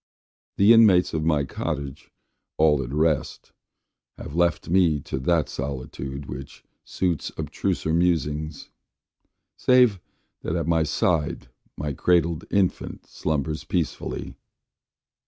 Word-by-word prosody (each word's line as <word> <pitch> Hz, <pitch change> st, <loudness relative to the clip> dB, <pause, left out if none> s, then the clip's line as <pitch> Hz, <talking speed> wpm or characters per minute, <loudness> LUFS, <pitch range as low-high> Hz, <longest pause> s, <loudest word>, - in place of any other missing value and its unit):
The 100 Hz, +4 st, +7 dB
inmates 105 Hz, -6 st, +5 dB
of 80 Hz, -1 st, -1 dB
my 75 Hz, -3 st, +2 dB
cottage, 70 Hz, 0 st, -5 dB, 0.5 s
all 75 Hz, -3 st, +4 dB
at 65 Hz, -1 st, -6 dB
rest, 75 Hz, 0 st, -1 dB, 0.7 s
Have -, -, -8 dB
left 85 Hz, 0 st, +1 dB
me 85 Hz, -4 st, +3 dB
to 65 Hz, -, -4 dB
that 80 Hz, +2 st, +1 dB
solitude, 65 Hz, +1 st, -5 dB
which 70 Hz, +2 st, -9 dB, 0.2 s
suits 90 Hz, -5 st, -2 dB
Abstruser 80 Hz, -, -2 dB
musings: 80 Hz, -3 st, -1 dB, 0.8 s
save 125 Hz, -6 st, +4 dB, 0.4 s
that 80 Hz, -, -3 dB
at 85 Hz, -2 st, -1 dB
my 85 Hz, 0 st, +2 dB
side 80 Hz, -3 st, 0 dB, 0.3 s
My 75 Hz, 0 st, -3 dB
cradled 85 Hz, +1 st, +1 dB
infant 95 Hz, -3 st, -1 dB
slumbers 75 Hz, 0 st, -3 dB
peacefully. 85 Hz, -4 st, -3 dB
80 Hz, 110 wpm, -24 LUFS, 70-85 Hz, 0.8 s, The